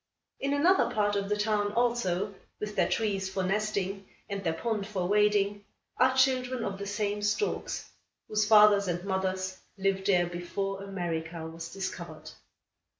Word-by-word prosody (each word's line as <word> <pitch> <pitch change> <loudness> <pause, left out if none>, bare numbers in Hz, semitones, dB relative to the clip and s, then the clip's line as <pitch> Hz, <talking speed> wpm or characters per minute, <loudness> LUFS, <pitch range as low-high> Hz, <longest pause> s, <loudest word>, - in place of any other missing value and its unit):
In 280 +1 0
another 350 +7 +4
part 205 -1 +1
of 200 0 -1
the 210 - +1
town, 210 -1 +1
also, 210 -5 +1 0.3
with 210 0 -4
their - - +2
trees 200 -4 0
for 190 0 -2
nesting, 195 0 -1 0.2
and 200 -1 -4
their 165 - +1
pond 210 +1 -2
for 190 -4 -2
wading, 205 0 +2 0.3
are 260 +1 +4
children 255 -2 +2
of 195 -1 -3
the 200 - -4
same 205 0 -1
storks, 210 - -1 0.4
whose 215 -1 +1
fathers 210 -2 +7
and 175 +1 -2
mothers 190 -1 -1 0.2
lived 195 0 0
there 180 -3 +4
before 195 +3 -4
America 170 -4 -4
was 165 0 -7
discovered. 195 -1 -6
200 Hz, 150 wpm, -29 LUFS, 190-210 Hz, 0.4 s, fathers